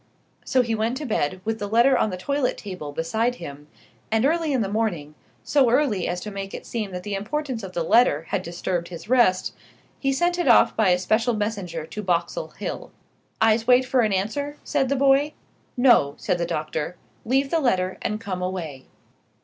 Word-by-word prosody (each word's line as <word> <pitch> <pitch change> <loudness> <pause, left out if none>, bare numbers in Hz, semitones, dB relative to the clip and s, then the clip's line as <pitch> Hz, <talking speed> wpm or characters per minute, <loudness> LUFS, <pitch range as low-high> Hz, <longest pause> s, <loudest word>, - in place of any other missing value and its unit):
So 255 -1 +2
he 230 -1 -2
went 225 +3 -1
to 300 - -5
bed, 185 - -1
with 225 0 -2
the 205 - -3
letter 235 +5 +4
on 215 - +2
the 185 - -5
toilette 280 +7 -1
table 185 -8 -7
beside 220 +11 -1
him; 145 -6 -9 0.4
and 220 +3 +2
early 320 +1 +1
in 260 -4 +1
the - - -2
morning 195 -8 -2 0.3
so 275 -4 +3
early 235 - +2
as 175 0 -2
to 210 - -6
make 195 -1 -6
it - - -8
seem 220 -4 -3
that 180 -1 -6
the 205 - -4
importance 245 +5 -3
of 190 -2 -8
the 170 - -1
letter 165 -6 +4
had - - 0
disturbed 170 0 -3
his 175 +2 -9
rest 240 -8 +3 0.5
he 275 - +1
sent 350 +6 +1
it 350 - 0
off 235 - +5
by 220 -4 +3
a 180 - +4
special 220 +6 +1
messenger 200 -7 -3
to 210 +6 -6
Boxall 185 - -1
Hill. - - -5 0.5
"I'se 225 +1 +3
wait 255 +1 +5
for 255 0 +1
an 215 -2 +1
answer?" 285 +10 -2
said 275 -3 0
the 280 - +1
boy. 275 +2 +3 0.4
"No," 235 - +4
said 175 - -1
the 170 - -1
doctor: 155 +2 -3 0.3
"leave 270 +4 +1
the 330 - +2
letter, 185 -9 0
and 210 - -2
come 195 -5 -4
away." 165 -8 -5
215 Hz, 200 wpm, -24 LUFS, 180-255 Hz, 0.5 s, off